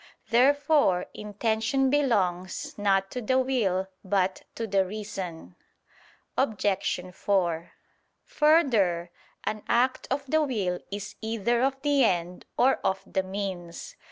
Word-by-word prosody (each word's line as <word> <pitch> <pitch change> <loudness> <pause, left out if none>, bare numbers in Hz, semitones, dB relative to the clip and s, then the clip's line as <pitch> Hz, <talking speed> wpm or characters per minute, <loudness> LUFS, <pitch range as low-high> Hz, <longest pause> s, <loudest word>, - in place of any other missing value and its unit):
Therefore 280 - +4
intention 220 +5 0
belongs 190 -11 0
not 195 -1 +1
to 250 - -4
the 260 +3 +1
will 220 -8 +1 0.2
but 190 -1 0
to 230 - -3
the 195 -2 +2
reason. 185 - -6 0.8
Obj. 195 -6 0
4: 175 -4 0 0.5
Further, 225 - +2 0.3
an 215 0 -2
act 250 +2 +2
of 275 +1 -1
the 310 +3 +2
will 205 -11 -1
is 205 0 -6
either 230 +1 0
of 270 +1 +1
the 285 -2 +3
end 180 -4 0
or 265 +2 +4
of 190 - -1
the 190 - -1
means. 190 - -5
210 Hz, 120 wpm, -27 LUFS, 185-260 Hz, 0.8 s, Therefore